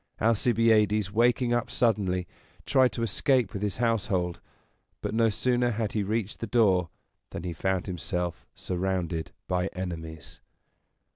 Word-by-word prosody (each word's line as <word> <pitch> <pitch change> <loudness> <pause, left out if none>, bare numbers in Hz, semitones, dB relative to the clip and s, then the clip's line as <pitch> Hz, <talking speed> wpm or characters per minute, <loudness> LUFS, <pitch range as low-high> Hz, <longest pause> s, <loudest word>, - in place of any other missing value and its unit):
Alcibiades, 110 -2 +3
waking 120 +2 +3
up 120 -1 0
suddenly, 95 -6 +1 0.4
tried 130 -3 +4
to 115 - -2
escape 115 +1 +1
with 100 - -4
his 105 -2 -2
household; 100 -7 0 0.6
but - - -4
no 115 0 +3
sooner 120 +3 +1
had 110 -2 -2
he 105 - 0
reached 105 +1 -2
the 115 - -4
door 95 -7 +3 0.4
than - - -6
he 90 -2 -3
found 95 +2 -1
himself 90 -1 -3
surrounded 90 -3 -2 0.2
by 90 0 0
enemies. 80 -4 -7
105 Hz, 135 wpm, -28 LUFS, 90-115 Hz, 0.6 s, tried